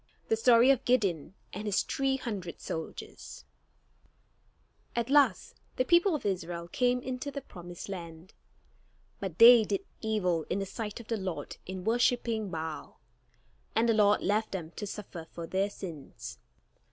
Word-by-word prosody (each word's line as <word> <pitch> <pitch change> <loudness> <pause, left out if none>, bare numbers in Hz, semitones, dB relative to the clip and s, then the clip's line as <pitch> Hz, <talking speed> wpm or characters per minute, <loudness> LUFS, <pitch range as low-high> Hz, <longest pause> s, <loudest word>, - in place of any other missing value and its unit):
THE 225 - +4
STORY 235 +3 +6
OF 265 -1 +1
GIDEON 195 - +1 0.2
AND 210 +3 -5
HIS 200 - +2
THREE 270 -1 0
HUNDRED 200 -9 -5
SOLDIERS 160 0 -7 1.5
At 235 +2 -1
last 290 -1 +3
the 255 - +1
people 345 +3 +4
of 295 - -5
Israel 175 -3 -2
came 250 +6 +1
into 255 +2 -4
the 280 -1 -6
promised 175 -6 -9
land, 170 -1 -8 0.9
but 190 -5 -5
they 235 0 +10
did 390 - -2 0.2
evil 180 -8 0
in 180 - 0
the 195 - -1
sight 210 +2 -5
of 230 - -11
the 230 - -1
Lord 190 -4 -5
in 185 0 -5
worshipping 230 -1 +1
Baal; 160 -2 -6 0.8
and 225 +1 +3
the 230 - +4
Lord 210 -1 +4
left 210 +2 0
them 170 -4 -4
to 205 +3 -6
suffer 190 -5 -7
for 170 - -5
their 190 +4 0
sins. 140 - -8
205 Hz, 150 wpm, -30 LUFS, 175-240 Hz, 1.5 s, they